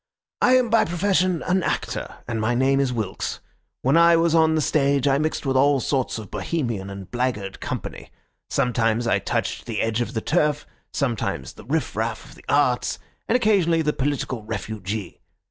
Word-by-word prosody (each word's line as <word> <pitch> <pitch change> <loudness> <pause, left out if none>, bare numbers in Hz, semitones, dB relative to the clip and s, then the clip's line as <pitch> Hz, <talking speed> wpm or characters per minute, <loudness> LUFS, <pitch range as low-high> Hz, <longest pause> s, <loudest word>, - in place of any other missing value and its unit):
"I 250 - +5
am 250 -3 +2
by 230 - +5
profession 180 0 +1
an 185 +1 +1
actor, - - -2 0.2
and 110 -1 -2
my 115 +2 +1
name 135 +2 +3
is 135 -2 +1
Wilks. 110 -6 -3 0.4
When 135 +4 +3
I 170 0 +7
was 165 0 +3
on 160 -1 +4
the - - +2
stage 140 -2 +2
I 140 0 +3
mixed 155 0 -1
with 135 -1 0
all 140 +1 +4
sorts 130 -1 -1
of 105 -4 -9
Bohemian 110 - -2
and 100 -1 -9
blackguard 120 -6 -2
company. - - -5 0.4
Sometimes 120 -3 +1
I 115 - +2
touched - - -2
the 115 -3 -3
edge 115 +1 0
of 120 +1 -3
the - - +1
turf, 150 -1 +1 0.3
sometimes 115 - -2
the - - -14
riff - - -1
raff - - -2
of - - -14
the - - -17
arts, 130 -4 +2 0.3
and 230 - +2
occasionally 190 -9 +3
the 150 0 +1
political 130 -4 -2
refugee. 105 -2 -5
135 Hz, 180 wpm, -23 LUFS, 115-160 Hz, 0.4 s, I